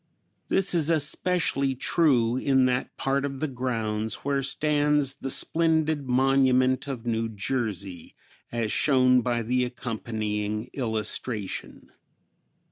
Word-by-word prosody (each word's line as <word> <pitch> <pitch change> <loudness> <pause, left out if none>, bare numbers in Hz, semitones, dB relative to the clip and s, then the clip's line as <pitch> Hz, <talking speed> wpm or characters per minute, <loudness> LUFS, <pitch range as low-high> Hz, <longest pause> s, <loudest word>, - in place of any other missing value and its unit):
This 190 -1 +1
is 165 -3 +2
especially 155 -3 +1
true 125 -5 +2
in 130 0 +2
that 125 0 -1
part 135 +1 0
of 135 -1 -4
the 155 - -1
grounds 110 -5 -2
where 140 -1 0
stands 145 0 +1
the 135 -1 -6
splendid 160 -1 +1
monument 130 0 +3
of 125 -4 -5
New 115 -1 -1
Jersey, 100 -5 -4 0.4
as 115 -2 -2
shown 130 -3 +4
by 120 -1 -1
the 125 +3 +1
accompanying 110 -3 -4
illustration. 110 -3 -3
130 Hz, 115 wpm, -26 LUFS, 115-140 Hz, 0.4 s, shown